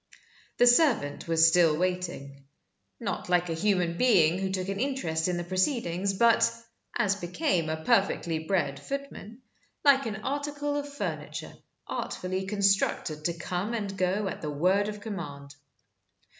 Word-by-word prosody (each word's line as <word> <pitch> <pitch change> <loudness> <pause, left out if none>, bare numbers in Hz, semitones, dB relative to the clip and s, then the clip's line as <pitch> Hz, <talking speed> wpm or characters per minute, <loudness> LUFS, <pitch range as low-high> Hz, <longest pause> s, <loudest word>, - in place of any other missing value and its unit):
The 245 - +5
servant 240 - +3
was 165 0 +5
still 165 -2 +4
waiting 175 -6 -3 0.5
not 200 -5 -4
like 180 -1 +2
a - - 0
human 175 -1 0
being 185 -9 +4
who 190 0 -1
took 185 -1 -2
an 195 0 -3
interest 210 -13 -1
in 180 -1 -1
the 175 - -3
proceedings, 185 - 0
but 230 +1 +4 0.5
(as 200 0 +1
became 180 - -1
a 160 0 -4
perfectly 170 -4 +2
bred 160 -5 -1
footman) 265 - -7 0.4
like 275 -3 +5
an 215 -1 -5
article 290 +1 -2
of 290 0 -4
furniture 285 - -5 0.3
artfully 185 +1 -4
constructed 195 -6 +1
to 170 - 0
come 180 +6 -3
and 200 -3 -4
go 190 +2 0
at 190 - -5
the 150 - -3
word 185 +8 +2
of 210 -1 -6
command. 145 -9 -7
190 Hz, 145 wpm, -28 LUFS, 170-225 Hz, 0.5 s, The